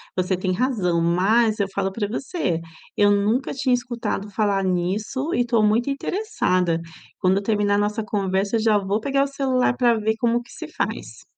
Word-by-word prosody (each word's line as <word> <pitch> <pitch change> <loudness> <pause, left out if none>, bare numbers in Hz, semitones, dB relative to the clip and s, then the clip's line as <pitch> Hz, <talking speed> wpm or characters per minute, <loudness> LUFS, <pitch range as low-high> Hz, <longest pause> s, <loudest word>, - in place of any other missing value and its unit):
Você 185 0 0
tem 185 0 -1
razão, 185 -7 0
mas, 210 +7 +2
eu 200 - +1
falo 195 -1 -1
para 205 +1 -2
você, 215 - -2 0.3
eu 205 0 +4
nunca 215 +6 +1
tinha 265 -2 0
escutado 240 -4 -2
falar 200 -1 0
nisso 200 - -1
e 245 - +2
estou 235 -2 +2
muito 220 +5 +2
interessada. 185 - 0 0.4
Quando 185 0 +2
eu 200 - -2
terminar 205 -1 +1
a - - +2
nossa 210 +2 0
conversa, 200 0 -1
eu - - 0
já 215 -2 +3
vou 200 +2 -1
pegar 275 +2 +1
o - - -1
celular 265 -3 0
para 240 -2 +3
ver 220 +1 0
como 240 -1 +1
que - - -18
se - - -8
faz. - - -5
210 Hz, 190 wpm, -23 LUFS, 195-245 Hz, 0.4 s, eu